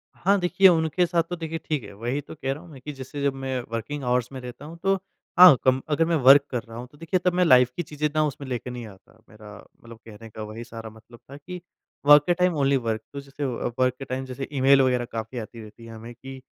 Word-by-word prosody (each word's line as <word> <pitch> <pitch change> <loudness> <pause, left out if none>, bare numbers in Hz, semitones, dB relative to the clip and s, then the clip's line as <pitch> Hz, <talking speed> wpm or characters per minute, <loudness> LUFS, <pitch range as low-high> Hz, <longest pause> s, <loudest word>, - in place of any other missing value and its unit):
हाँ 200 +2 +2
देखिए, 185 +2 +4
उनके 165 0 +2
साथ 170 -1 +1
तो 175 - -3
देखिए 165 -1 -5
ठीक 150 -7 -2
है। - - -11
वही 120 +7 -3
तो 145 - -12
कह 135 -2 -3
रहा 150 - -10
हूँ 175 - -15
मैं 135 -3 -13
कि 150 +2 -7
जैसे 135 +2 -8
जब 140 -1 +1
मैं 135 -1 -4
वर्किंग 135 +6 -4
आवर्स 125 0 0
में 130 - -7
रहता 125 +3 -9
हूँ 165 +2 -10
तो 195 0 +3 0.4
हाँ 180 -6 +11
कम 130 0 +3
अगर 160 +2 +2
मैं 170 - +1
वर्क 140 +2 +8
कर 125 -3 -2
रहा 115 0 -11
हूँ 125 +1 -7
तो 145 - -19
देखिए 165 +3 -1
तब 180 - +3
मैं 180 0 +2
लाइफ़ 125 -4 +6
की 175 - -3
चीज़ें 150 -1 -2
ना 155 - +3
उसमें 145 -1 -5
लेके 125 0 -4
नहीं 120 -2 -7
आता। 100 +3 -18
मेरा 105 -1 -13 0.3
मतलब 115 -1 -12
कहने 110 +1 -12
का 110 0 -8
वही 110 +2 -8
सारा 115 -1 -9
मतलब 110 +2 -17
था 140 - -9
कि 180 +4 -9 0.4
वर्क 145 0 +8
के 175 - +4
टाइम 180 -1 +1
ओनली 140 0 +2
वर्क 115 -3 -2
तो 140 - -5
जैसे 140 +1 -6
वर्क 125 0 -1
के 135 - -6
टाइम 130 +1 -4
जैसे 130 +1 -6
ईमेल 135 0 +5
वग़ैरह 125 -2 +1
काफ़ी 115 +2 -5
आती 115 +1 -9
रहती 110 +2 -13
है 115 - -10
हमें 115 +2 -10
कि 130 +2 -11
135 Hz, 260 wpm, -24 LUFS, 120-150 Hz, 0.4 s, हाँ